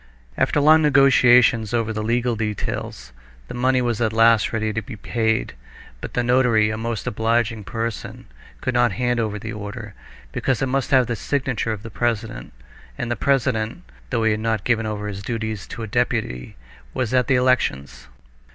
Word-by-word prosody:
After - - +1
long 155 +2 +6
negotiations 125 -6 +5
over 115 -1 -1
the 110 - -3
legal 120 +2 0
details, 105 - -4 0.4
the - - -8
money 130 +1 +1
was 120 -2 -1
at 110 -2 +1
last 115 -1 +4
ready 110 -1 -1
to 110 - -2
be 110 +2 -9
paid; 110 +1 -1 0.5
but - - -7
the 125 - +1
notary, 120 -3 +3
a - - -3
most 115 -1 -4
obliging 115 0 0
person, 115 +5 -5 0.4
could 130 - -1
not 120 -3 +2
hand 120 +1 0
over 110 -2 -1
the 110 +2 -6
order, 105 +1 -7 0.4
because 130 -4 -1
it - - 0
must 135 0 -1
have 130 -2 +4
the 120 - -2
signature 130 -2 -2
of 110 -1 -5
the 115 - -8
president, 110 - -3 0.5
and 120 -1 -3
the - - +1
president, 125 -6 0 0.3
though 115 - 0
he 110 - +3
had 105 - -1
not 110 -2 -1
given 115 -2 +1
over 105 -1 -4
his 100 -1 -5
duties 110 -1 -4
to 115 - -7
a - - -5
deputy, 110 - -2 0.4
was 125 -1 -1
at 125 -1 +2
the 135 - +3
elections. 70 - 0
115 Hz, 180 wpm, -22 LUFS, 110-125 Hz, 0.5 s, long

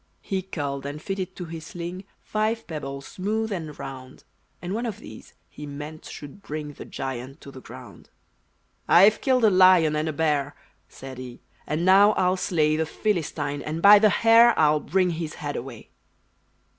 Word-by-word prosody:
He 190 -2 -2
culled 145 -7 -5
and 145 +1 -6
fitted 190 +2 -5
to 180 - -6
his 165 -1 -8
sling 175 +4 -7 0.2
Five 220 +2 -1
pebbles, 140 -4 -6
smooth 215 +6 -3
and 160 -6 -5
round; 130 -1 -9 0.4
And 180 +2 -5
one 235 +3 -2
of 210 -4 -5
these - - -13
he 150 - -10
meant 150 +2 -8
should 145 +7 -10
bring 150 -3 -6
The - - -10
giant 130 +2 -6
to 140 - -11
the 130 - -12
ground. - - -13 0.8
"I've 200 +5 +6
killed 255 -3 +2
a 215 - +6
lion 185 -4 +5
and 155 +1 -1
a - - -3
bear," 145 -2 0 0.3
Said 130 -1 -10
he, 125 -1 -9 0.3
"and 155 +3 -1
now 200 +3 +6
I'll 185 -1 +1
slay 155 -5 +1
The 160 0 -1
Philistine, 150 -8 -2
and 155 +3 -4
by 205 +3 +8
the 215 0 +5
hair 230 +3 +5
I'll 150 -1 +4
bring 185 +2 0
his 160 -2 -5
head 145 -1 -5
away!" 120 -3 -8
160 Hz, 175 wpm, -24 LUFS, 145-195 Hz, 0.8 s, by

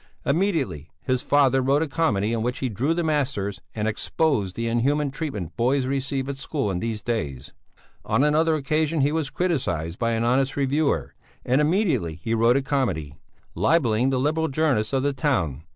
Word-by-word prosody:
Immediately 140 - 0
his 130 -1 0
father 135 -2 +3
wrote 140 +4 +2
a - - -2
comedy 115 -9 0
in 115 - -1
which 125 +3 -1
he 130 - -2
drew 130 - 0
the 175 - 0
masters 135 - -1
and 110 -1 -1
exposed 110 - 0
the 115 0 -2
inhuman 140 +5 +1
treatment 135 - -5
boys 130 +3 +1
receive 135 0 -2
at 140 -1 -4
school 135 -5 -2
in 90 - -2
these 110 0 -3
days. 70 - -3 0.5
On 135 - +1
another 155 +2 +3
occasion 155 +1 0
he 140 +2 +2
was 155 -3 -1
criticized 90 - -2
by 115 -1 +1
an 115 0 0
honest 130 +3 +1
reviewer, 140 +2 0 0.3
and 130 +4 +3
immediately 150 - +1
he 85 +8 -3
wrote 115 +3 +4
a 135 - -1
comedy, 105 - -1 0.4
libelling 120 - +2
the 130 -1 0
liberal 155 +4 +1
journalists 135 -7 +1
of 135 -1 +1
the 145 0 +1
town. 85 - -1
135 Hz, 180 wpm, -24 LUFS, 110-150 Hz, 0.5 s, wrote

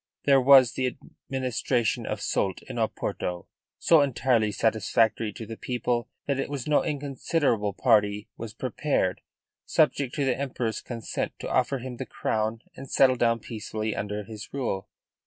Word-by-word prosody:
There 135 -2 +5
was 130 -2 +7
the 130 - -1
administration 125 -3 -2
of - - -3
Soult 95 -3 -1
in - - -8
Oporto, 90 -1 -2 0.3
so 165 -3 +5
entirely 120 -5 +2
satisfactory 110 0 +1
to 110 - -7
the 115 +1 -7
people 120 -1 -2 0.2
that 140 -1 -1
it 135 - -2
was 140 -4 -4
no 150 -1 +3
inconsiderable 140 - 0
party 105 -2 +2
was 110 -1 -8
prepared, 125 -6 -1 0.5
subject 135 -3 +2
to 140 - 0
the 130 -2 +2
Emperor's 125 -5 -3
consent, 115 -2 -4
to - - -6
offer 130 +2 +2
him 125 -1 -7
the 130 - -5
crown 110 +2 -2
and 135 0 -9
settle 130 -1 +5
down 115 -2 +2
peacefully 110 -1 -4
under 105 +1 -3
his 110 0 -9
rule. 120 -8 -3
120 Hz, 155 wpm, -27 LUFS, 110-135 Hz, 0.5 s, was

